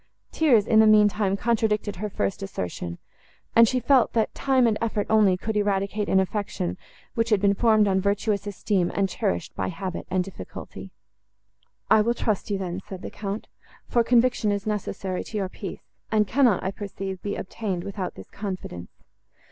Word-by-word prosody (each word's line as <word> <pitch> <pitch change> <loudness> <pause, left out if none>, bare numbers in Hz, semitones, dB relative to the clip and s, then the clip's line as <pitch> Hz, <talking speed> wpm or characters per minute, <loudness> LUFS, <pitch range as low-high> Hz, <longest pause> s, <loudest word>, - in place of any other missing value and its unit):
Tears, 250 -10 +4
in 220 -1 +4
the 220 - +7
mean 210 -1 +7
time, 200 -1 0
contradicted 215 -2 0
her 210 +3 -3
first 195 0 -2
assertion; 90 - -5 0.6
and 230 0 +8
she 255 +3 +1
felt, 260 -1 +3
that 225 -2 +1
time 265 -2 +2
and 225 -2 +3
effort 215 -2 0
only 210 -4 +5
could 220 +3 -3
eradicate 205 0 0
an 190 - +4
affection, 190 -2 -2 0.4
which 230 0 0
had 210 -3 +4
been 200 0 +3
formed 215 -1 +4
on 190 -1 +2
virtuous 200 0 0
esteem, 195 -2 0
and 195 -1 +2
cherished 90 - -2
by 95 - -2
habit 185 - -5
and 185 0 +1
difficulty. 195 0 -9 1.0
"I 215 - +7
will 235 +3 +1
trust 215 -4 -1
you 200 - 0
then," 185 -1 -4
said 190 -2 -7
the - - -6
Count, 205 +1 -5 0.4
"for 235 - +2
conviction 240 -2 +3
is 200 -1 -2
necessary 195 -3 -3
to 215 - -6
your 195 -2 -1
peace, 190 0 -8 0.3
and 215 -1 +3
cannot, 240 -3 +3
I 190 - -1
perceive, 195 -2 -6
be 205 - -3
obtained, 190 -3 -4
without 195 -2 -5
this - - -12
confidence. 185 - -6
205 Hz, 180 wpm, -25 LUFS, 190-220 Hz, 1.0 s, and